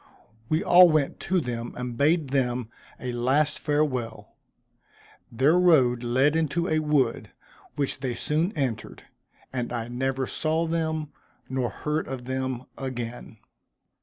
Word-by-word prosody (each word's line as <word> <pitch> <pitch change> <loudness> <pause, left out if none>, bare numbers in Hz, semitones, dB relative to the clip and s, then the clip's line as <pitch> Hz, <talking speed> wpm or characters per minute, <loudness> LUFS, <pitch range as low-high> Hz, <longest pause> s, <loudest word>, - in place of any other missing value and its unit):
We 155 +2 +1
all 180 0 +8
went 155 -3 +1
to 185 0 +3
them, 120 -4 -4
and 125 -1 -4
bade 150 +3 +2
them 125 -3 0 0.3
a 125 - -4
last 135 +5 +1
farewell. 130 -8 -1 1.0
Their 140 +9 +3
road 130 -9 +4
led 130 +5 +2
into 165 +2 0
a 155 - +2
wood, 150 -6 +1 0.5
which 140 -2 -2
they 125 -3 -3
soon 160 - 0
entered, 130 -8 -3 0.5
and 125 -2 -3
I 120 -1 -3
never 130 +2 -1
saw 160 +4 0
them 160 -2 -2 0.4
nor 130 -2 -1
heard 150 +1 -3
of 130 -2 -6
them 130 -1 -3 0.2
again. 120 -4 -6
135 Hz, 135 wpm, -26 LUFS, 125-155 Hz, 1.0 s, all